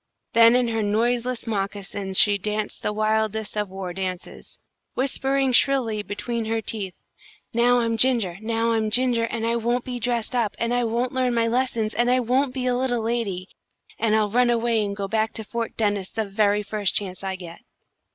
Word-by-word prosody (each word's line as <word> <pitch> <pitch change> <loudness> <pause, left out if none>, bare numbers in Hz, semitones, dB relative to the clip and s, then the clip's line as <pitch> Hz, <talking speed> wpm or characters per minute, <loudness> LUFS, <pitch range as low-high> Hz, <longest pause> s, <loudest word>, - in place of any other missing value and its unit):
Then 230 +1 +7
in 250 -1 +2
her 225 -1 -1
noiseless 235 +4 0
moccasins 200 -2 -3
she 205 -1 +5
danced 210 +1 -3
the - - -1
wildest 215 0 -1
of 210 -2 -1
war 190 -1 -6
dances, 185 -1 -6 0.4
whispering 270 0 0
shrilly 240 -5 +2
between 210 +3 -4
her 225 +1 -1
teeth, 205 -4 -4 0.6
"Now 240 +1 +3
I'm 230 -1 0
Ginger! 225 -7 +3
Now 230 +1 0
I'm 220 -1 +1
Ginger! 240 0 +3
And 230 0 -3
I 230 +1 +1
won't 240 +2 -1
be 250 -1 -4
dressed 240 0 -1
up, 235 -4 0
and 235 +1 -1
I 245 -1 +1
won't 240 +2 -1
learn 255 -2 +1
my 230 0 +2
lessons, 230 -2 0
and 240 +1 +1
I 255 +1 +3
won't 255 +3 +1
be 255 0 -4
a 250 -1 +1
little 245 -2 -1
lady, 215 -6 -2 0.5
and 220 -1 +2
I'll 210 -2 +1
run 245 +2 +3
away 230 -2 +1
and 200 -1 -3
go 200 -1 -3
back 220 +1 0
to 220 - -5
Fort 230 +2 -5
Dennis 205 -3 0
the 220 -1 -2
very 205 +1 +1
first 205 -1 -1
chance 190 -2 -2
I 190 -1 -2
get!" 175 -2 -10
225 Hz, 190 wpm, -24 LUFS, 205-240 Hz, 0.6 s, Then